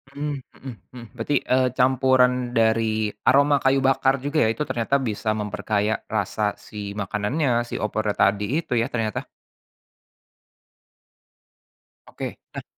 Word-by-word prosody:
Mhm 145 0 -3 0.2
mhm 130 -1 -8 0.2
mhm, 120 - -8
berarti, 125 +5 -1 0.2
eee, 130 0 +4
campuran 130 0 +4 0.2
dari 110 -1 +2 0.2
aroma 140 +2 +5
kayu 135 +1 +4
bakar 135 0 +3
juga 145 +2 -2
ya - - +2
itu 150 - -1
ternyata 120 +3 0
bisa 110 -2 -2
memperkaya 105 +1 -1
rasa 105 0 -1
si 100 -1 -7
makanannya 105 - -1 0.2
si - - -6
opornya 105 0 -1
tadi 100 +1 +2 0.2
itu 155 - -5
ya 115 - 0
ternyata? 110 -3 -2 2.8
Oke - - -7 0.2
nah, - - -5
115 Hz, 125 wpm, -23 LUFS, 105-135 Hz, 2.8 s, aroma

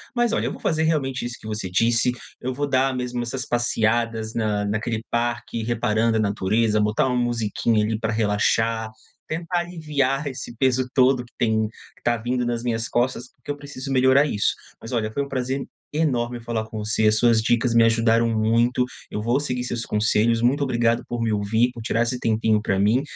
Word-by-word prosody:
Mas 240 -1 +2
olha, - - 0
eu - - -2
vou - - -9
fazer 160 -1 +1
realmente 135 -6 0
isso 120 -1 -5
que 110 - -10
você 105 -3 -4
disse, 115 +6 +2 0.3
eu 130 +1 -2
vou 145 +3 -2
dar 130 -1 +2
mesmo 125 -1 -3
essas 125 +2 -4
passeadas 115 -1 0
na 105 -2 0
naquele 110 +2 -2
parque, 120 -1 -2
reparando 115 -1 +1
a - - +1
natureza, 105 +1 +1
botar 105 +4 +2
uma 125 - 0
musiquinha, 115 -2 +1
ali, 110 0 -1
pra 115 -1 -1
relaxar. 110 +1 +1 0.4
Tentar 170 +2 -2
aliviar 150 -5 -1
esse 130 -3 -6
peso 130 0 +2
todo 130 -1 +4
que 120 - -23
tem 110 -3 +2 0.3
que - - -26
tá 120 0 +2
vindo 120 +2 -1
nas 120 -1 -1
minhas 115 -2 -1
costas, 125 +1 -1
porque 130 - -19
eu - - -3
preciso 140 -1 -7
melhorar 130 +2 +5
isso. 105 -7 +1 0.3
Mas 115 - -8
olha, 110 -3 -1
foi 140 +4 -1
um 140 - -8
prazer 130 +1 -2 0.3
enorme 125 -6 0
falar 115 -1 -3
com 110 0 -7
você, 105 +1 +1
as 110 0 +3
suas 115 -1 +4
dicas 120 +1 +1
me 115 - +6
ajudaram 115 0 +3
muito, 115 +3 +2 0.3
eu 105 - -4
vou 120 +5 +1
seguir 125 -4 -2
os 125 - -4
seus 120 -2 -3
conselhos, 110 +2 +2
muito 135 +5 +2
obrigado 120 -3 +1
por 120 -1 -3
me 115 - +1
ouvir, 110 +4 +1
por 115 - -8
tirar 115 +1 0
esse 125 +1 -2
tempinho 110 -1 +1
pra 95 -3 0
mim, 105 +6 +3
120 Hz, 200 wpm, -23 LUFS, 110-130 Hz, 0.4 s, me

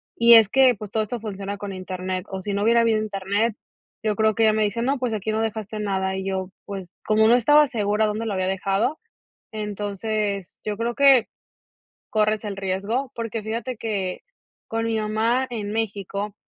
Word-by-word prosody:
y 235 0 +8
es 225 -2 +8
que, 260 0 +5
pues, 210 -1 -9
todo 220 - +1
esto 235 +3 -4
funciona 200 -2 -5
con 200 -1 -6
internet, 185 0 -4
o, 190 0 -5
si 205 - -3
no 200 - -1
hubiera 235 +2 +5
habido 225 -2 +3
internet 205 +1 -1 0.5
yo 215 -1 +1
creo 220 0 +2
que 225 - +2
ella 215 -1 +5
me 215 - +1
dice: 210 +2 -1
"No 270 +2 0
pues 245 -3 -1
aquí 215 +1 -2
no 220 +1 0
dejaste 220 -1 -3
nada". 190 -2 -1
Y 190 - -4
yo, 190 -1 -3
pues, 195 -2 -6 0.2
como 215 0 +4
no 230 - +6
estaba 295 +5 +6
segura 210 -3 +1
dónde 215 +2 -2
lo 210 - -1
había 185 -1 -1
dejado, 195 +8 0 0.5
entonces, 205 -1 -3
yo 210 -1 -2
creo, 235 +1 -2
que 275 -5 +6 0.8
corres 215 -1 +1
el 205 -2 -4
riesgo. 200 +7 -2
Porque 230 -1 -4
fíjate 230 +4 -4
que 195 -5 -3 0.5
con 225 0 -1
mi 225 -1 0
mamá 225 +4 +1
en 210 -4 -4
México, 205 -2 -3
215 Hz, 195 wpm, -23 LUFS, 200-230 Hz, 0.8 s, y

